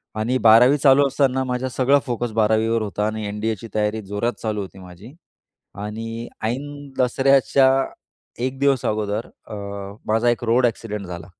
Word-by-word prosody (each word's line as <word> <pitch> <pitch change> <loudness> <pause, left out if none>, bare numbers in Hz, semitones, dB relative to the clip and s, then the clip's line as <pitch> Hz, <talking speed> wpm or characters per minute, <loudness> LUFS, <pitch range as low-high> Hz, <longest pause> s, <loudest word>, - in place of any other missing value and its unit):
आणि 115 +4 0
12वी 125 +6 +7
चालू 140 0 +5
असताना 130 -1 +1
माझा 125 0 -2
सगळा 135 +3 +3
फोकस 120 -1 -3
12वी 110 +1 +2
वर 115 -1 +1
होता 105 0 -2
आणि 110 0 -4
एन-डी-एची 110 +1 -3
तयारी 105 +1 0
जोरात 105 +5 -2
चालू 105 -2 -2
होती 95 0 -9
माझी 90 +7 -13 0.7
आणि 115 +2 -6 0.2
ऐन 145 +4 -4
दसऱ्याच्या 135 +1 +4 0.7
एक 130 +1 -3
दिवस 140 -3 +2
अगोदर 105 +1 -2 0.2
अ, 110 - -8 0.5
माझा 115 +2 +2
एक 120 - -2
रोड 120 +2 +3
एक्सिडेंट 105 -4 -4
झाला. 85 -1 -8
115 Hz, 155 wpm, -22 LUFS, 105-130 Hz, 0.7 s, 12वी